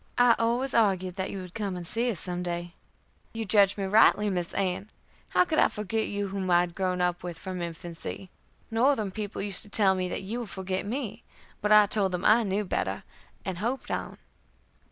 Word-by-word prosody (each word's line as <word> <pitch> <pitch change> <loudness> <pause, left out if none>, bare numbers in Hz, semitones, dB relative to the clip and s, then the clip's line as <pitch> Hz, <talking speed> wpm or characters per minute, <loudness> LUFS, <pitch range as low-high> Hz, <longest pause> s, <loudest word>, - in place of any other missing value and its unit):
I 245 -1 +6
always 240 +3 0
argued 190 -5 +2
that 190 - -2
you 195 - -5
would 180 -1 -10
come 200 -4 -3
and 175 -1 -6
see 230 +7 -1
us 205 -8 -3
some 180 -1 -3
day." 175 0 -4 0.6
"You 225 -1 -3
judged 200 0 +4
me 200 - -2
rightly, 210 +1 +4
Miss 175 -2 -2
Ann[e]. 190 0 -1 0.4
How - - +4
could 315 -3 0
I - - +6
forget 215 +1 -2
you 205 -1 -3
whom 190 -1 -3
I 175 0 +5
had 175 -1 -3
grown 185 -1 -1
up 180 0 0
with 175 -2 -6
from 185 +1 -6
infancy. 170 +2 -7 0.4
Northern 225 -3 +2
people 205 0 -5
used 200 -2 +4
to 210 - -11
tell 200 -2 +4
me 185 -1 -2
that - - -4
you 220 +6 -4
would 235 -4 -6
forget 190 +1 -3
me, 230 -2 -4 0.4
but 210 - 0
I 210 0 +8
told 200 -2 +1
them 180 +1 -3
I 220 +3 +6
knew 205 -1 -1
better, - - -2 0.4
and 185 -3 -3
hoped 240 +6 -3
on." - - -4
195 Hz, 210 wpm, -28 LUFS, 180-215 Hz, 0.6 s, I